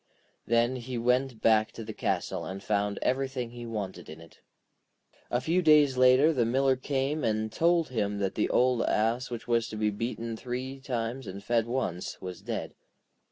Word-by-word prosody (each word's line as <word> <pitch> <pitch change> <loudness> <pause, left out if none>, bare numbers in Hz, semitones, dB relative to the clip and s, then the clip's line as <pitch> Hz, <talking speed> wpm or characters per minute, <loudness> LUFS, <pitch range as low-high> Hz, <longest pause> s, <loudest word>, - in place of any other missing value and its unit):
Then 120 +2 +2
he 125 0 -5
went 125 0 0
back 110 -1 +4
to 115 - -7
the 110 0 -7
castle - - -2
and 95 +1 -6
found 100 -1 0
everything 130 -2 -1
he 120 -1 -8
wanted 105 -7 -5
in 80 +1 -9
it. 80 -1 -16 0.9
A 120 - +1
few 165 +8 +1
days 150 -5 +5
later 130 +5 +5
the 125 -5 +2
Miller 130 +3 +2
came 140 +3 -1
and 110 0 0
told 170 -2 +2
him 105 -4 -1
that 100 -2 -1
the 105 - 0
old 125 -1 +3
ass 115 +4 +1
which 120 -1 -6
was 115 -1 +2
to - - -7
be 105 0 +1
beaten 115 +2 -4
three 130 +3 -5
times 125 -1 -3
and 100 +1 -7
fed 115 0 +1
once, 115 -8 -3
was 90 -2 -7
dead. - - -4
120 Hz, 180 wpm, -29 LUFS, 110-130 Hz, 0.9 s, days